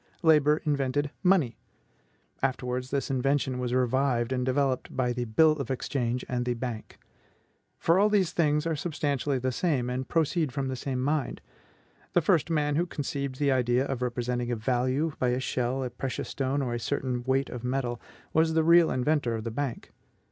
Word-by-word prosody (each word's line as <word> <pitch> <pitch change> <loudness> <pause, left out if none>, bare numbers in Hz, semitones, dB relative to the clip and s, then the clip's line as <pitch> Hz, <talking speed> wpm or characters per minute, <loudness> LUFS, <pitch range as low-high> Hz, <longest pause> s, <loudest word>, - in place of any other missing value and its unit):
Labor 150 -1 +4
invented 145 0 0
MONEY. 180 - +2 0.8
Afterwards, 125 -1 -1
this 140 0 -1
invention 135 0 0
was 125 -1 -2
revived 125 -1 +1
and 125 -1 0
developed 130 0 0
by 125 -2 +1
the 120 0 -2
BILL 155 +8 +4
OF 140 -5 -3
EXCHANGE 125 -2 -2
and 125 -1 -1
the 120 0 -1
BANK. 120 -2 -6 0.8
For 170 +3 +3
all 210 +1 +4
these 195 -5 +2
things 150 -2 +1
are 165 -1 0
substantially 145 -3 -1
the 130 +1 -1
same, 125 -4 0
and 130 +1 -3
proceed 165 -2 +1
from 135 +1 -2
the 130 - -2
same 130 0 -3
mind. 145 -1 -1 0.7
The 175 - +4
first 170 -1 +2
man 150 -2 +1
who 175 +2 +1
conceived 140 -3 -4
the 140 -1 +2
idea 125 0 +2
of 135 -3 -3
representing 125 0 -2
a - - +1
value 130 +7 0
by 130 - +1
a 125 +1 0
shell, 130 0 -1
a 125 - -4
precious 130 0 -4
stone, 135 +1 -1
or 120 -2 -2
a 120 - -2
certain 125 0 -2
weight 135 +2 0
of 125 -1 -6
metal, 125 -1 -2 0.3
was 160 0 +3
the 160 - +4
real 170 +1 +6
inventor 125 -2 +1
of 110 - -4
the 115 - -4
Bank. 130 0 -4
130 Hz, 185 wpm, -28 LUFS, 125-150 Hz, 0.8 s, real